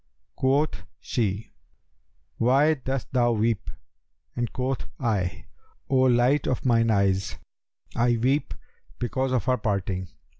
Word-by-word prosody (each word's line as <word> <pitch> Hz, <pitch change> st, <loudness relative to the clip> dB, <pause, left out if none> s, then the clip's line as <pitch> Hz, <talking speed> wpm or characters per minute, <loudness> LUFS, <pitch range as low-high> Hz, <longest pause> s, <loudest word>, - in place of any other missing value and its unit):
Quoth 140 Hz, +4 st, +1 dB, 0.2 s
she, 105 Hz, -2 st, -2 dB, 0.9 s
'Why 135 Hz, +6 st, +4 dB
dost 135 Hz, -3 st, -4 dB
thou 120 Hz, -2 st, +3 dB
weep?'; 110 Hz, -3 st, 0 dB, 0.7 s
and 120 Hz, -2 st, -2 dB
quoth 130 Hz, +1 st, -2 dB
I, 100 Hz, -8 st, -1 dB, 0.5 s
'O 135 Hz, -, +4 dB
light 130 Hz, +2 st, +3 dB
of 130 Hz, +2 st, -1 dB
mine 115 Hz, -2 st, +3 dB
eyes, 100 Hz, -2 st, +1 dB, 0.6 s
I 120 Hz, 0 st, +2 dB
weep 135 Hz, +6 st, 0 dB, 0.4 s
because 130 Hz, +2 st, -1 dB
of 130 Hz, -2 st, 0 dB
our 130 Hz, -1 st, +2 dB
parting.' 95 Hz, -3 st, -2 dB
120 Hz, 115 wpm, -26 LUFS, 110-130 Hz, 0.9 s, Why